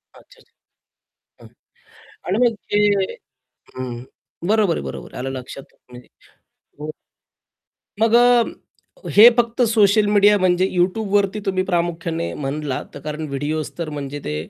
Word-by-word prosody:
अच्छा-अच्छा. - - -21 0.9
हां. - - -15 0.8
आणि 190 - 0
मग 230 -2 +1 0.2
ते 205 - +3 1.0
हं, 125 -1 -5 0.5
बरोबर 215 -5 +2
आहे, - - -5
बरोबर 65 -2 -8
आहे - - -7
आलं 135 +1 -4
लक्षात. 135 +2 -11 0.2
म्हणजे 125 0 -13 0.7
हं. 150 - -5 1.1
मग 225 +1 +2
अ, 245 - 0
हे 220 +3 +10
फक्त 235 +1 +1
सोशल 210 -1 +4
मीडिया 205 0 +5
म्हणजे 185 0 +2
YouTubeवरती 195 +2 +1
तुम्ही 185 -1 0
प्रामुख्याने 170 -2 -2
म्हणलात, 140 -1 -4
तर - - -9
कारण 150 0 -5
व्हिडिओज 145 +3 -3
तर 170 -2 -4
म्हणजे 145 -1 -6
ते 75 - -3
175 Hz, 130 wpm, -20 LUFS, 145-210 Hz, 1.1 s, हे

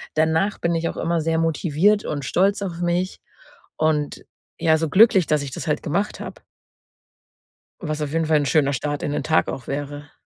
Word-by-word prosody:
Danach 160 +6 +1
bin 170 0 0
ich 165 0 -1
auch - - -7
immer 170 0 0
sehr 160 +1 0
motiviert 165 +5 +2
und 145 -2 -3
stolz 195 +8 +1
auf 175 -3 -5
mich 175 +2 -1 0.6
und, 155 -2 -1 0.3
ja, 160 -1 +3
so 160 0 -1
glücklich, 195 -1 +5
dass 150 -1 +1
ich 140 - -6
das - - -6
halt 150 - -1
gemacht 200 +7 -2
habe. - - -8 1.4
Was 155 -5 -3
auf 150 -1 -3
jeden 165 0 +1
Fall 155 -1 +3
'n 145 - -1
schöner 140 +1 +2
Start 145 +2 -3
in 145 - -2
den - - -1
Tag 160 - +2
auch 125 - -5
wäre. 145 +1 -5
160 Hz, 195 wpm, -22 LUFS, 145-175 Hz, 1.4 s, glücklich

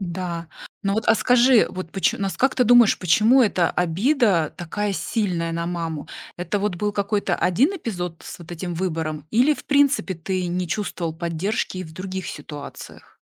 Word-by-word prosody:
Да, 170 -2 -4 0.3
ну 195 -1 0
вот, 220 - -1
а - - +6
скажи, 245 +2 +4
вот 185 -3 -7
поч 195 - +1
нас 195 -1 -3
как 265 0 +2
ты 250 - +4
думаешь, 240 -2 +6
почему 215 +9 +4
эта 185 -6 +2
обида 185 - +1
такая 200 +4 -3
сильная 180 -5 -1
на 170 0 -2
маму? 165 -4 -4 0.3
Это 175 +3 -2
вот 200 -1 -1
был 205 +4 -2
какой-то 200 -2 0
1 230 - +2
эпизод 180 - -5
с - - -8
вот 170 - -12
этим 175 +1 -5
выбором 160 -4 -3
или 255 +7 +4
в - - -12
принципе 280 -8 +2
ты 180 +2 -3
не 180 +1 -2
чувствовал 175 -3 -3
поддержки 170 +4 -2
и 185 - -4
в 160 - -12
других 185 +1 -5
ситуациях? 145 -1 -9
185 Hz, 175 wpm, -23 LUFS, 170-215 Hz, 0.3 s, а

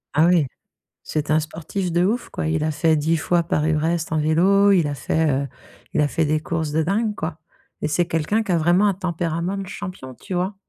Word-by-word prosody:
Ah, 155 +3 +5
oui, 175 -4 +4 0.6
c'est 155 -1 -3
un 155 +1 +4
sportif 170 +4 -4
de 175 +1 +2
ouf, 225 +6 0
quoi. 155 - -3
Il 155 -1 0
a 155 - +1
fait 155 +1 +2
10 160 +3 +1
fois 170 +2 +1
Paris-Brest 160 +1 0
en 155 - +1
vélo. 190 +6 +4
Il 175 -5 +3
a 145 - -2
fait, 160 +2 0
heu, - - -6 0.5
il - - +3
a 145 - +2
fait 160 +2 0
des 155 +1 +1
courses 160 -1 -2
de 160 +2 +1
dingue, 210 +6 0
quoi, 160 -4 -5 0.4
et - - -1
c'est 170 +3 +1
quelqu'un 175 +6 0
qui 200 - -2
a 170 - +3
vraiment 175 +5 +3
un 200 - +3
tempérament 175 0 -2
de 195 - -5
champion, 185 -9 -7
tu 185 - -7
vois? 185 +3 -1
165 Hz, 225 wpm, -22 LUFS, 155-185 Hz, 0.6 s, Ah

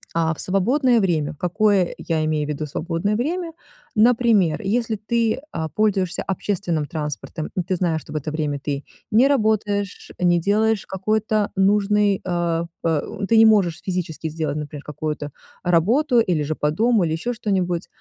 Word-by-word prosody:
а, 165 -1 +2
в - - -13
свободное 240 +7 +2
время, 160 -6 0
какое 195 0 +2
я 160 -2 -1
имею 155 -1 0
в - - -7
виду 150 +1 -3
свободное 170 +7 -2
время? 330 +8 -2 0.4
Например, 220 -7 +3
если 220 +2 0
ты, 225 +2 0
а, 160 0 -3
пользуешься 195 -2 0
общественным 180 -5 -2
транспортом, 150 +1 -5
ты 185 +1 -1
знаешь, 165 -3 0
что - - -13
в - - -1
это 150 +1 -4
время 150 -2 -2
ты 140 0 -3 0.3
не 235 +5 +5
работаешь, 210 -6 0
не 175 -1 +3
делаешь 215 +3 +1
какой-то 215 +2 0
нужной, 205 +1 +3
э, 170 -2 0 0.2
э, 160 -3 +1 0.3
ты 230 - +5
не 225 - +8
можешь 200 -7 +3
физически 175 -4 -3
сделать, 155 -2 -3
например, 150 -1 -6
какую-то 150 0 -4 0.3
работу 235 - +3
или 180 -9 +1
же 155 +2 -2
по 150 0 0
дому, 220 +3 +2
или 160 - -1
ещё 180 +10 -2
что-нибудь, 185 -6 -1
185 Hz, 160 wpm, -22 LUFS, 160-215 Hz, 0.4 s, не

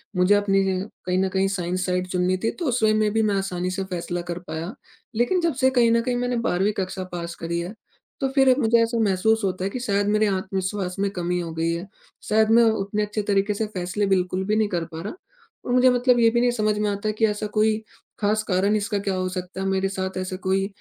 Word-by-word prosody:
मुझे 180 +3 +4
अपनी 200 -1 +2
ये 190 -1 0 0.3
कहीं 180 0 0
न 190 0 +1
कहीं 190 +1 +1
साइंस 185 -1 -2
साइड 180 0 -1
चुननी 185 0 0
थी 225 - +1
तो 345 - -2
उस 250 -2 0
वे 215 0 +5
में 215 -1 +2
भी 225 - +2
मैं - - +1
आसानी 185 -2 -2
से 195 +1 -2
फैसला 175 0 -3
कर 170 - -4
पाया, 165 +5 -5 0.4
लेकिन 245 +11 +2
जब 335 -2 +1
से 260 - +7
कहीं 235 -1 +5
न 230 0 +3
कहीं 245 +1 -1
मैंने 245 0 -1
12वीं 195 +4 +1
कक्षा 185 0 -3
पास 170 -1 -5
करी 170 +1 -3
है, 175 +4 -5 0.5
तो 270 - +1
फिर 265 -2 +5
मुझे 235 -2 +4
ऐसा 230 +1 -1
महसूस 220 +3 +2
होता 185 -1 -1
है 195 - 0
कि 250 - -5
शायद 205 -4 0
मेरे 215 +1 +3
आत्मविश्वास 190 -1 -2
में 200 0 +1
कमी 180 -2 -2
हो 170 -2 -4
गई 165 +1 0
है, 170 +3 -5 0.4
शायद 220 0 +2
मैं - - +6
उतने 210 -2 +1
अच्छे 210 +1 -2
तरीके 200 +1 +2
से 220 +2 -2
फैसले 185 +3 -1
बिल्कुल 185 -1 +1
भी 210 - +2
नहीं 215 -1 +2
कर 175 -3 -2
पा 160 0 -8
रहा 205 - -5 0.5
और - - -3
मुझे 255 +1 +5
मतलब 245 0 +3
ये 230 -1 +6
भी 235 +1 +1
नहीं 245 0 +3
समझ 215 -3 0
में 210 0 +1
आता 200 +1 -2
कि 215 +1 +1
ऐसा 210 0 -1
कोई, 215 +1 +2 0.4
खास 215 +1 +1
कारण 200 +2 +1
इसका 205 0 -1
क्या 195 -1 -2
हो 185 0 -1
सकता 185 +1 -5
है, - - -2
मेरे 195 0 0
साथ 190 -1 -4
ऐसा 185 0 -3
कोई 190 +1 0
195 Hz, 245 wpm, -24 LUFS, 185-220 Hz, 0.5 s, से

